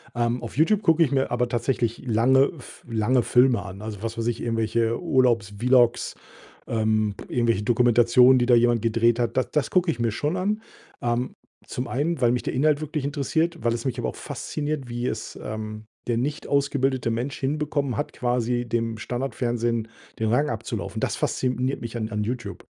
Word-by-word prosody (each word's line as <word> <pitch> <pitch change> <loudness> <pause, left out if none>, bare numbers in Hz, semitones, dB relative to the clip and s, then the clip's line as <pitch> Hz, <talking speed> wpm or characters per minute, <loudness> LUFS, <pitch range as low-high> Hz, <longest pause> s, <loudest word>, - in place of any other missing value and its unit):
Ähm, 120 +1 0
auf 115 - -7
YouTube 200 +7 +3
gucke 165 -2 +5
ich 145 - 0
mir 135 -1 +1
aber 120 0 0
tatsächlich 120 -1 -1
lange 130 +4 +4
f 130 - -14
lange 115 +3 +2
Filme 125 -3 +4
an. 95 +1 -9
Also, 105 -2 -6
was 115 0 -4
weiß 115 0 -1
ich, 120 -1 -1
irgendwelche 115 0 0
Urlaubs-Vlogs, 120 - +2 0.5
ähm, 110 -2 +1
irgendwelche 115 -4 +1
Dokumentationen, 120 +2 +5
die 120 - +2
da 125 - +5
jemand 120 -1 +3
gedreht 115 +1 +2
hat. 115 -1 -1
Da 130 - +3
das 150 - -1
gucke 180 -2 +3
ich 120 - -8
mir 115 -1 +2
schon 145 - -2
an, 210 +4 -1 0.4
ähm, 120 +1 -1 0.3
zum 125 - -4
einen, 155 +6 -1
weil 120 -2 +4
mich 125 - -1
der - - -3
Inhalt 150 +2 +2
wirklich 155 -2 -3
interessiert, 160 +4 0
weil 115 - +2
es 115 - -4
mich 130 -3 -1
aber 115 - -2
auch - - -5
fasziniert, 150 -3 -4
wie 120 +1 -3
es, 110 -2 -4
ähm, 110 0 -6 0.2
der 120 - +1
nicht 145 +5 -3
ausgebildete 135 -3 +1
Mensch 125 +5 -3
hinbekommen 145 -2 -1
hat, - - -3
quasi 120 0 -1
dem 115 -1 -1
Standardfernsehen 120 -1 -2 0.3
den 110 - 0
Rang 145 +6 +2
abzulaufen. 110 - -4
Das - - -1
fasziniert 130 +1 -1
mich 115 0 -6
an 110 -2 -2
an 105 -1 -2
YouTube. 120 +2 -5
120 Hz, 185 wpm, -24 LUFS, 115-135 Hz, 0.5 s, gucke